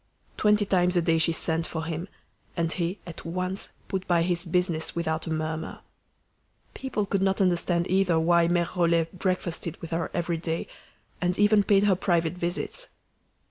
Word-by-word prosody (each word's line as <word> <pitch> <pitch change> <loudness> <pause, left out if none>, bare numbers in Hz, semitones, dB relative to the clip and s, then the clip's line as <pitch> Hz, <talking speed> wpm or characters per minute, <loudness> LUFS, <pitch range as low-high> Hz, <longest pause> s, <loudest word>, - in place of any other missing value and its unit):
Twenty 210 0 +3
times 180 -2 +2
a 175 - +4
day 165 0 +3
she 165 +1 +3
sent 165 0 0
for 160 -1 -4
him, 165 +2 -4 0.5
and 165 -1 0
he 180 +2 -2
at 170 -2 -9
once 185 +3 -2 0.2
put 190 -1 -3
by 170 -2 +3
his 175 +1 -1
business 170 -2 0
without 160 -1 -2
a - - -2
murmur. 160 0 -3 0.9
People 260 -6 -2
could 195 -1 0
not 195 0 +1
understand 175 -2 +2
either 185 -3 +3
why 170 +1 +4
Mere 175 0 +2
Rollet 170 0 +1
breakfasted 180 -3 -2
with 165 - -8
her 165 0 -1
every 170 -1 -1
day, 165 0 -2 0.6
and 180 0 +1
even 205 0 +5
paid 200 0 +3
her 200 -2 +4
private 170 -3 +1
visits. 180 - -2
175 Hz, 170 wpm, -27 LUFS, 165-185 Hz, 0.9 s, even